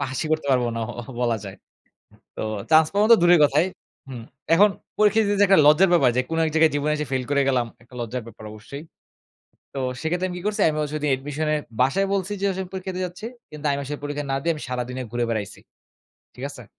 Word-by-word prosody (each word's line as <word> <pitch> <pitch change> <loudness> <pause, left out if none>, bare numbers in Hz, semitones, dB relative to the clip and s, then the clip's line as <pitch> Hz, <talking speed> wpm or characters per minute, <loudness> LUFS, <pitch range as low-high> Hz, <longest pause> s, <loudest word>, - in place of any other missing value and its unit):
পাসই 135 +2 -3
করতে 155 -2 -1
পারবো 125 -2 +2
না 115 - -2 0.2
অহ 120 - -7
বলা 120 -2 +1
যায়। 100 -1 -8 0.8
তো - - -4 0.3
চান্স 155 0 +6
পাওয়া 205 +1 +3
তো - - +11
দূরের 175 -1 +6
কথাই 150 +4 +3 0.4
হুম, 125 -4 -8 0.3
এখন 205 +5 +6 0.3
পরীক্ষা 210 +1 +4
দিতে 205 0 0
যে - - +6
একটা 195 -3 +5
লজ্জার 165 +5 +6
ব্যাপার 165 -7 +5
যে 130 - +4
কোনো 165 0 -1
এক 160 - 0
জায়গায় 160 0 +4
জীবনে 150 +1 0
এসে 150 0 -3
ফেইল 130 -1 0
করে 140 -1 +2
গেলাম, 125 -3 +2 0.2
একটা 125 - -23
লজ্জার 120 +1 -4
ব্যাপার 110 - -12
অবশ্যই। 125 +8 -10 0.9
তো - - -4 0.2
সেক্ষেত্রে 175 +3 -1
আমি 180 - -6
কী - - -9
করছি? 210 - -1
আমিও 150 0 -1
সেদিন 150 -1 -2
অ্যাডমিশনে 145 +3 -1 0.2
বাসায় 185 +10 +2
বলছি 195 +1 -2
যে, - - -2
"আস 190 - -4
আমি 185 - -5
পরীক্ষাতে 185 -1 -5
যাচ্ছি।" 180 +5 -9 0.2
কিন্তু 150 0 -10
আমি 140 - 0
আসলে 145 +2 -5
পরীক্ষা 145 0 -4
না 135 - +1
দিয়ে 170 +2 +1
আমি 150 - -9
সারাদিনে 125 +1 -4
ঘুরে 120 0 0
বেড়াইছি। 105 -3 -4 0.8
ঠিক - - -7
আছে? - - -11
150 Hz, 220 wpm, -23 LUFS, 130-175 Hz, 0.9 s, তো